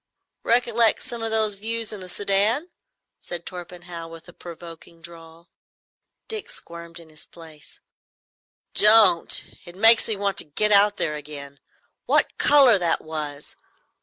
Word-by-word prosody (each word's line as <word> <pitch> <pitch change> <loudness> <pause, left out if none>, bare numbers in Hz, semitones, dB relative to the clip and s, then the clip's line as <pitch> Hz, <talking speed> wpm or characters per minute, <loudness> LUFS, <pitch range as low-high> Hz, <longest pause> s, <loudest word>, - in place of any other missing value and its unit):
"Recollect 235 -1 +2
some 235 -1 -6
of 225 - -3
those 220 -1 +1
views 225 +2 -4
in 210 - -8
the 185 -1 -9
Soudan?" 205 - 0 0.5
said 170 -1 -8
Torpenhow, 175 -2 -9
with 165 0 -13
a 175 - -14
provoking 170 -1 -12
drawl. 165 0 -14 0.8
Dick 445 +1 -7
squirmed 170 - -10
in 165 -1 -16
his 155 -1 -10
place. 160 -3 -15 0.9
"Don't! 210 -5 +5 0.2
It 175 - -13
makes 225 +3 +5
me 220 - -1
want 200 -1 -2
to - - -2
get 210 +8 -1
out 205 0 +4
there 150 - -2
again. 145 -2 -9 0.5
What - - +1
colour 270 -8 +5
that 170 -2 0
was! 150 -2 -6
180 Hz, 140 wpm, -23 LUFS, 165-220 Hz, 0.9 s, Don't